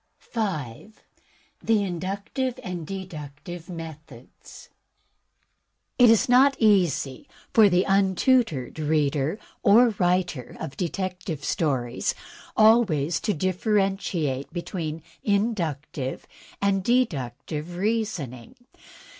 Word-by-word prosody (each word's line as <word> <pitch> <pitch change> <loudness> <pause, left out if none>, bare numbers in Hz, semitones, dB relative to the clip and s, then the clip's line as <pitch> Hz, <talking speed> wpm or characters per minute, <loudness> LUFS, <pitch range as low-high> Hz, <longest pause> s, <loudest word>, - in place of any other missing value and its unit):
5. 195 - -5 0.6
The 220 -2 +2
Inductive 200 +8 -3
and 175 -6 -5
the 195 -1 -5
Deductive 160 +2 -9
Methods 155 -7 -11 1.3
It 245 -2 +8
is 225 +4 +4
not 265 +3 +5
easy 180 - +2 0.3
for 215 -3 +7
the 180 0 +3
untutored 195 - +2
reader 150 +1 +1 0.2
or 235 +4 +6
writer 175 -8 0
of 135 - -6
de 175 +4 -1
tective 180 -6 -4
stories 130 -7 -1 0.4
always 200 -9 +4
to 210 -3 -1
differentiate 185 - 0
between 165 -3 -4 0.2
inductive 165 - -1 0.3
and 195 -1 +1
deductive 160 - -1
reasoning. 195 - -2
180 Hz, 90 wpm, -25 LUFS, 150-210 Hz, 1.3 s, It